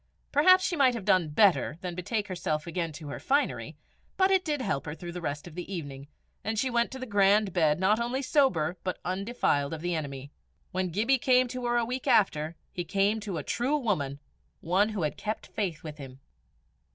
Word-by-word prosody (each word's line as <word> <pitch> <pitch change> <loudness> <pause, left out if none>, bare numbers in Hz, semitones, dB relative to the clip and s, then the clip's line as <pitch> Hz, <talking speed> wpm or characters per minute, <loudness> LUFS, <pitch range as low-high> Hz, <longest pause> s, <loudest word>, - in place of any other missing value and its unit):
Perhaps 370 +6 +6
she 350 - 0
might 265 -5 +4
have 215 -5 -6
done 185 -5 +3
better 170 -2 +3
than 180 -1 -4
betake 205 +4 -2
herself 155 -5 -2
again 170 -1 -3
to 150 -1 -8
her 140 - -5
finery, 280 +2 0 0.4
but 380 0 +4
it 380 -1 +4
did 300 -3 -1
help 190 - -2
her 150 - -4
through 175 +2 -7
the 180 +1 -6
rest 145 -2 -4
of 175 - -10
the 180 +3 -7
evening, 140 -6 -6 0.4
and 220 +1 -2
she 255 +4 0
went 235 0 +2
to 265 - -7
her 260 - -5
grand 205 -2 +3
bed 160 -3 +2
not 205 +4 +3
only 245 +3 -1
sober, 180 - +2
but 185 - -2
undefiled 185 -7 0
of 155 - -9
the 175 +1 -1
enemy. 140 -3 -5 0.4
When 185 0 -1
Gibbie 230 +10 +2
came 255 0 +4
to 250 0 -4
her 240 0 +2
a 235 - +2
week 250 +2 -4
after, 160 -5 +2 0.2
he 175 - -3
came 200 +5 +1
to 205 -5 -4
a 150 - -4
true 260 - 0
woman, 150 - -1 0.4
one 190 +6 +2
who 210 -6 -3
had 150 - -2
kept 215 +1 -4
faith 185 -6 -3
with 155 -1 -8
him. 135 -1 -10
190 Hz, 215 wpm, -28 LUFS, 160-240 Hz, 0.4 s, Perhaps